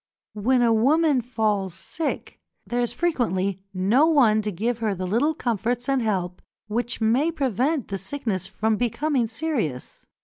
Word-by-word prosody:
When 245 +4 +2
a 230 -1 +4
woman 285 +4 +3
falls 210 -6 -1
sick, 325 -1 -4 0.3
there 245 +1 -1
is 240 - 0
frequently 200 - -1
no 205 +11 +3
one 240 -9 +4
to 210 0 -3
give 225 +6 -2
her 215 -3 0
the 185 0 -4
little 245 - +1
comforts 240 0 -1
and 270 -2 +2
help 185 -5 -2 0.2
which 235 +3 -2
may 250 +9 +2
prevent 275 - 0
the 195 -1 -3
sickness 215 -3 -3
from 220 0 0
becoming 245 +2 0
serious. 225 - -3
230 Hz, 150 wpm, -24 LUFS, 205-270 Hz, 0.3 s, a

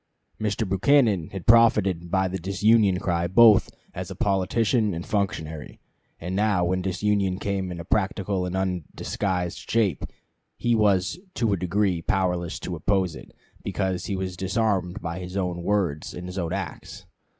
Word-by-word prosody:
Mr. 105 0 -1
Buchanan 100 - +3
had 95 -3 -7
profited 105 -7 +4
by 95 +1 +1
the 95 +1 -4
disunion 100 +2 +3
cry 85 -2 -1
both 105 +3 +6 0.2
as - - -6
politician 105 +2 +1
and 85 - -5
functionary; 80 -8 -3 0.4
and 90 +3 -4
now 100 -3 +2
when 90 +1 0
disunion 95 0 0
came 95 -2 -2
in 85 - -6
a 85 - -7
practical 95 -2 -1
and 90 - -4
undisguised 90 0 -3
shape 105 - +1 0.5
he 120 - +1
was 105 - +2 0.2
to 115 -4 +1
a - - +3
degree 90 0 0
powerless 90 -2 -1
to 90 - -5
oppose 95 0 0
it, - - -12 0.3
because 95 -2 -2
he 100 - -2
was 95 -1 -4
disarmed 95 -1 -1
by 85 +1 -4
his 90 +1 -6
own 90 -2 -2
words 85 -6 -1
and 90 - -7
his 90 +1 -5
own 85 -2 -2
acts. 95 -3 -6
95 Hz, 155 wpm, -25 LUFS, 90-105 Hz, 0.5 s, both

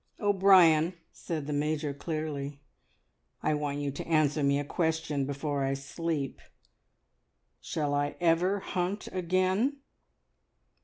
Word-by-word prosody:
"O'Brien," 185 -5 +5 0.2
said 155 -4 -5
the 150 - -3
Major 150 0 -1
clearly, 145 -2 -4 0.8
"I - - +2
want 145 -1 -2
you 145 -1 -2
to 140 - -7
answer 155 -2 +2
me 140 0 +3
a 145 - -1
question 160 -3 -1
before 140 0 -2
I 135 0 0
sleep. 140 0 -3 1.2
Shall 145 -2 -2
I 145 0 0
ever 175 +4 +2
hunt 185 +3 -2
again?" 185 +9 +1
155 Hz, 115 wpm, -29 LUFS, 145-175 Hz, 1.2 s, O'Brien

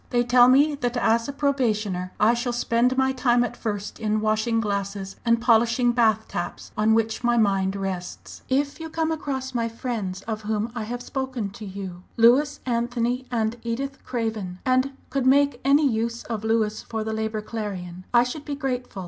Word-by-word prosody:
They 240 -1 +2
tell 245 0 +6
me 285 +4 +5
that 245 -3 -2
as 230 -1 +2
a - - -2
probationer 215 -10 0
I 220 +3 +5
shall 240 +1 -2
spend 240 +1 +1
my 265 0 +3
time 245 -2 +2
at 245 - -3
first 205 -2 -4
in 215 -1 0
washing 220 +2 +1
glasses, 200 -2 -3
and 230 -1 +3
polishing 235 +1 +3
bath 220 -2 +2
taps, 175 - -5
on 215 +1 +3
which 225 +1 0
my 240 0 +3
mind 195 -3 +2
rests! 190 -2 -5
"If 280 +3 0
you 320 0 -6
come 320 0 -1
across 265 -4 -3
my 230 -1 0
friends 220 -5 -4
of 220 -1 -4
whom 215 +1 -2
I 225 -3 -4
have 245 +2 -5
spoken 260 -6 -3
to 215 +1 -9
you 190 -2 -7 0.2
Louis, 275 +6 +4
Anthony, 245 +1 -1
and 225 -1 -1
Edith 270 +4 -4
Craven 220 -7 -3
and 255 +1 +2 0.2
could 265 -1 0
make 280 -1 +4
any 285 +2 +4
use 230 -1 -1
of 220 -3 -4
Louis 220 -1 +1
for 220 -1 -4
the 220 0 -3
Labour 220 -1 -2
Clarion, 185 -5 -5
I 240 -1 +6
should 265 +4 -5
be 290 - -4
grateful. 250 -6 -3
235 Hz, 185 wpm, -24 LUFS, 215-255 Hz, 0.2 s, tell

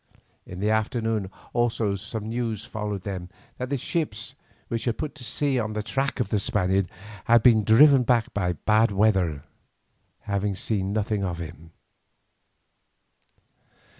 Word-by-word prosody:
In 90 - -8
the 105 +2 +1
afternoon 110 -2 0 0.2
also 115 -4 +1 0.3
news 110 -1 -3
followed 105 -3 -4
them 90 -2 -5 0.3
that 125 0 -3
the 140 - 0
ships 120 -7 -3 0.3
which 115 -1 -3
had 120 -3 0
put 150 - -4
to 150 - -12
sea 135 +1 0
on 110 -2 -2
the 105 0 -2
track 135 +5 -1
of 115 -6 0
the 105 - +1
Spaniard 95 -2 +1 0.4
had 115 -1 +5
been 110 -3 +6
driven 135 +6 +7
back 120 -2 +1
by 90 -3 0
bad 110 +5 +3
weather, 95 -8 +2 0.8
having 100 0 -1
seen 95 -1 -2
nothing 105 -1 -1
of 90 -3 -2
him. 80 0 -9
110 Hz, 140 wpm, -25 LUFS, 100-120 Hz, 0.8 s, driven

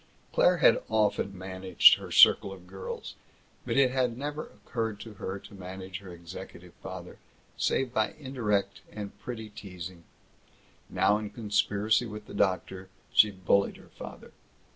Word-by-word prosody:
Claire - - +4
had - - +5
often 105 -3 +1
managed 95 0 +5
her - - -9
circle 100 - +7
of 95 -2 -11
girls, 95 +1 -7 0.5
but - - 0
it 135 -2 +5
had 125 -3 0
never 145 +3 -4
occurred 110 -2 -4
to 110 0 -9
her 95 -1 -5
to 100 - -14
manage 95 0 -7
her 95 -3 -11
executive 85 -1 -10
father - - -8 0.4
save 130 -2 0
by 110 -3 0
indirect 110 -9 -1
and 105 -2 -7
pretty 110 -3 -7
teasing. 90 -4 -9 0.9
Now, 105 +1 +3
in 105 -1 -5
conspiracy 105 +1 +1
with 105 -1 -8
the - - -11
doctor, 95 0 -1 0.2
she 105 - +7
bullied 100 0 +1
her - - -17
father. - - -10
105 Hz, 145 wpm, -29 LUFS, 95-110 Hz, 0.9 s, circle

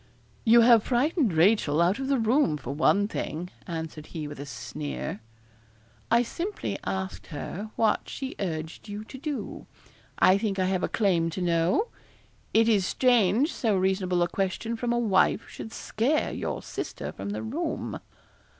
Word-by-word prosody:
'You 235 +1 +7
have 230 -1 +7
frightened 270 - +2
Rachel 160 -3 +3
out 180 +6 +3
of 270 - -2
the 275 0 +2
room, 225 - +2
for 135 -1 -5
one 200 +7 +3
thing,' 180 -4 -4 0.2
answered 160 -3 -5
he 155 -3 -5
with 145 -1 -8
a 140 - -6
sneer. 145 -6 -5 0.9
'I 235 +1 +4
simply 355 - -4
asked 190 0 -4
her 185 +6 -6
what 220 -2 +1
she 265 -1 -5
urged 160 +1 -4
you 205 +1 -5
to 265 +4 -10
do 290 0 -5 0.5
I 190 +2 +5
think 205 -2 -1
I 185 - +2
have 185 -1 0
a - - 0
claim 180 -6 +2
to 175 +3 -5
know. 175 - +2 0.6
It 225 +1 +4
is 210 -4 +4
strange 245 - +3
so 220 -5 +1
reasonable 185 -1 +1
a - - +1
question 195 +5 -2
from 235 +1 -2
a 240 - +2
wife 205 -2 +2
should 220 - -8
scare 260 +10 0
your - - -4
sister - - -5
from - - -6
the 205 - -3
room.' 310 +9 -3
205 Hz, 165 wpm, -27 LUFS, 175-235 Hz, 0.9 s, You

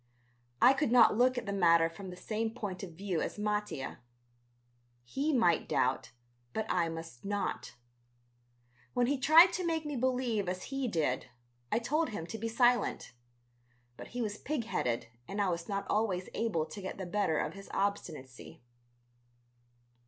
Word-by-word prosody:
I 260 - +8
could 270 -3 0
not 235 -3 +7
look 250 +2 +3
at 240 - -3
the 200 - -3
matter 170 -4 +5
from 185 +3 -9
the 180 - -8
same 220 +4 -2
point 205 -5 -5
of 185 -4 -7
view 185 -1 -2
as - - -3
Mattia. 210 -9 -2 1.0
He 275 - -1
might 225 - +2
doubt... 130 +1 +1 0.4
but 220 - -1
I 170 -2 +1
must 165 -6 -8
not. 205 -8 -3 1.2
When 245 -1 +3
he 275 +2 0
tried 320 +6 +7
to 370 - -2
make 325 -2 -1
me 295 -1 -3
believe 245 -6 0
as 185 +7 -5
he 270 -2 0
did, 150 - 0 0.4
I - - +3
told 300 +8 0
him 205 -7 -5
to 220 +5 -7
be 230 - -2
silent. 240 - +2 0.8
But - - -9
he 245 0 -3
was 210 -1 -4
pig 290 -4 -2
headed 125 - -1 0.2
and 200 - -5
I 200 -2 +2
was 170 +1 -3
not 200 0 -2
always 195 -4 0
able 185 -9 0
to 200 +5 -9
get 190 - -5
the 190 - -5
better 185 -3 0
of - - -1
his 195 0 -11
obstinacy. 160 -13 -4
205 Hz, 165 wpm, -32 LUFS, 175-245 Hz, 1.2 s, I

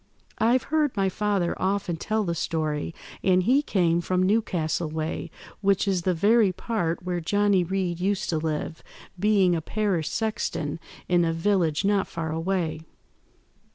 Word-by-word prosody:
I've 240 +3 +3
heard 300 -7 +2
my 195 -1 +2
father 200 -3 0
often 190 -2 0
tell 215 +6 -1
the 170 -3 -1
story, 155 -1 -2 0.3
and 185 -1 +4
he 260 +8 +4
came 175 - +1
from 185 +1 0
Newcastle 175 -6 0
way, 155 +1 -3 0.3
which 200 0 +2
is 190 -3 +1
the 185 +1 +1
very 210 +3 +4
part 185 -3 -2
where 175 -1 -2
Johnny 205 +1 +2
Reed 180 -1 -2
used 195 +2 0
to 160 - 0
live, 155 0 -3 0.4
being 195 -3 +3
a 165 - -1
parish 190 -4 -1
sexton 215 -9 -2 0.3
in 175 -1 +3
a 165 - +1
village 170 -1 +1
not 200 -1 +2
far 160 -2 -4
away. 165 -1 -1
185 Hz, 155 wpm, -26 LUFS, 165-205 Hz, 0.4 s, and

